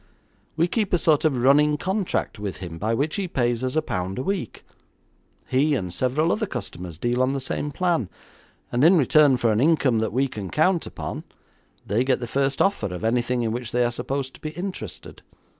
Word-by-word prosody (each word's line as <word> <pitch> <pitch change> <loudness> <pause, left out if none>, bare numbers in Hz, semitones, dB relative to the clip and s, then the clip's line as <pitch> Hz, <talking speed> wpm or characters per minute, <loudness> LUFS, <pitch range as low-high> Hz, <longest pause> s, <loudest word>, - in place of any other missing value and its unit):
We 165 +2 +3
keep 210 +1 -1
a - - +5
sort 160 -2 +3
of 130 -6 +1
running 150 +3 +5
contract 190 - -2
with 100 -5 -4
him 85 -2 -7
by 110 +5 0
which 150 - -1
he 195 -2 -1
pays 120 -6 0
us 130 +2 -2
a 155 - +2
pound 95 -8 -3
a 130 - -2
week. 195 - -4 0.8
He 145 +3 +2
and 90 -8 -3
several 130 - +1
other 215 -1 0
customers 90 - -6
deal 120 +6 0
on 130 +1 +2
the 140 - -1
same 135 +2 -3
plan, 165 - 0 0.6
and 120 +3 +1
in 175 +4 +7
return 145 -1 +5
for 120 -2 +2
an 110 +2 +1
income 140 -6 +3
that 110 - -1
we 130 +5 +1
can 105 -7 -6
count 170 +2 +2
upon, - - -6 0.6
they 110 +5 +1
get 130 -1 +1
the 120 - -4
first 135 +3 +1
offer 195 - 0
of 90 +1 -6
anything 120 +2 +1
in 110 - -1
which 120 0 -4
they 125 0 +2
are 120 - 0
supposed 135 +2 -3
to - - -16
be 155 - -4
interested. 180 +4 -7
130 Hz, 210 wpm, -24 LUFS, 115-155 Hz, 0.8 s, in